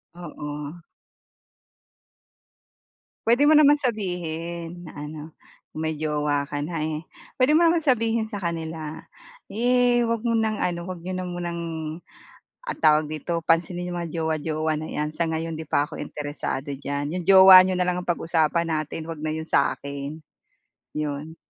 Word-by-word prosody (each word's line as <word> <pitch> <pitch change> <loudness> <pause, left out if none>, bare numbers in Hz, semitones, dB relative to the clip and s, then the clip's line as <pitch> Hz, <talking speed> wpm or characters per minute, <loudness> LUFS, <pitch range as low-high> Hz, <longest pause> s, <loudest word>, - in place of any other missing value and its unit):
Oo. 150 -1 -7 2.5
Pwede 240 +5 +5
mo 310 - +7
naman 295 -1 +7
sabihin. 175 - -4
Na - - -9 0.2
ano 155 0 -8 0.6
may 160 0 -1
jowa 150 -2 0
ka 145 - -3
na 165 -2 -3
eh. 155 +1 -3 0.3
Pwede 265 +3 +4
mo 325 - +5
naman 335 0 +4
sabihin 230 -4 +2
sa 205 -3 -6
kanila. 160 -2 -4 0.5
Eh 245 +1 +3
wag 230 0 -1
mo 230 - +2
ng 220 -1 +1
ano 175 -1 0
wag 185 -2 -5
niyo 185 +1 -4
na 185 0 -3
munang 175 -1 -4 1.0
ah 470 - -2
tawag 155 -1 +4
dito 160 +2 -3
pansinin 175 +2 +1
yung - - -3
mga 165 - -5
jowa, 160 -1 -1
jowa 155 0 -1
na 155 +1 -4
yan 150 +1 -3
sa 165 0 -1
ngayon 160 0 -2
di 160 - -6
pa 145 - +2
ako 155 - -9
interesado 145 -1 -4
diyan. 145 +2 -3
Yung 180 - -3
jowa 190 -1 +10
niyo 185 -1 0
na 180 - +2
lang 180 0 0
ang - - -9
pag-usapan 170 0 +1
natin 155 0 -3
wag 160 -2 -6
na 155 - -1
yun 160 0 -4
sa'kin. 140 +1 -1 0.8
Yun. 150 +2 -4
165 Hz, 160 wpm, -24 LUFS, 155-185 Hz, 2.5 s, jowa